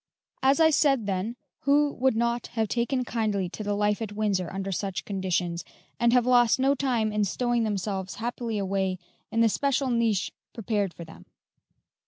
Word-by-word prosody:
As 270 +3 +4
I 320 -1 +6
said, 275 -6 +3
then, 200 +4 -2 0.2
who 290 +1 +3
would 260 -1 +1
not 235 +1 0
have 220 -1 +2
taken 245 +3 -1
kindly 215 -5 -1
to 215 - -7
the 205 0 -1
life 210 +1 +1
at 215 -2 -4
Windsor 205 -4 -1
under 195 0 -4
such 195 0 -3
conditions, 180 -3 -1 0.4
and 235 0 +4
have 245 -1 +4
lost 245 -1 +4
no 270 +1 +4
time 245 -6 0
in 210 0 +1
stowing 240 +4 0
themselves 195 -2 -3
happily 235 -1 -3
away 190 -1 -1 0.3
in 230 - +1
the 230 - +6
special 275 +2 0
niche 230 -4 +1 0.2
prepared 210 -4 -1
for 170 - -10
them? 160 - -14
220 Hz, 175 wpm, -27 LUFS, 195-245 Hz, 0.4 s, I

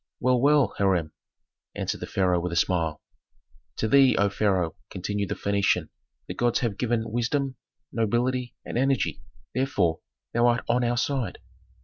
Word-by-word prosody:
"Well, 125 -1 +2
well, 140 -5 +4
Hiram," 90 -6 +2 0.6
answered - - -3
the - - -6
pharaoh 90 -2 +1
with 90 0 -3
a - - -3
smile. 85 -3 0 0.7
"To 110 - -1
thee, 135 +2 +6
O 100 0 +3
pharaoh," 95 -5 0
continued 100 +1 -3
the - - -1
Phœnician, 100 -1 +1 0.4
"the - - -4
gods 120 -1 +1
have 110 -5 -2
given 120 -2 +1
wisdom, 130 +3 -1 0.4
nobility, 120 +3 0
and - - -2
energy, 135 0 +1 0.3
therefore, 100 -12 +1 0.3
thou 120 +1 +4
art 120 0 +2
on 120 +1 +2
our 120 0 +1
side. 125 -6 -1
115 Hz, 150 wpm, -26 LUFS, 95-125 Hz, 0.7 s, thee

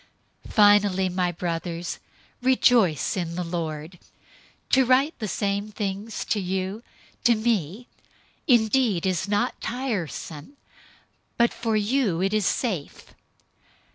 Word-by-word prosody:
003:001 - - -11
Finally, 205 -3 +5
my 180 -1 0
brothers, 170 0 -4 0.4
rejoice 245 - +3
in 170 -3 -3
the 180 - -2
Lord. 165 0 -5 0.7
To 265 - +5
write 260 +5 +3
the 215 - -3
same 200 +1 -2
things 205 +1 -4
to 215 - 0
you, 190 +3 -3 0.4
to 240 -1 +5
me 215 -1 -1 0.6
indeed 230 - +3
is 185 0 0
not 205 0 -1
tiresome, 215 - -4 0.8
but 235 0 +3
for 225 -2 -1
you 210 -4 +1
it 195 +3 0
is 215 -3 +2
safe. 190 - -3
200 Hz, 115 wpm, -25 LUFS, 175-230 Hz, 0.8 s, Finally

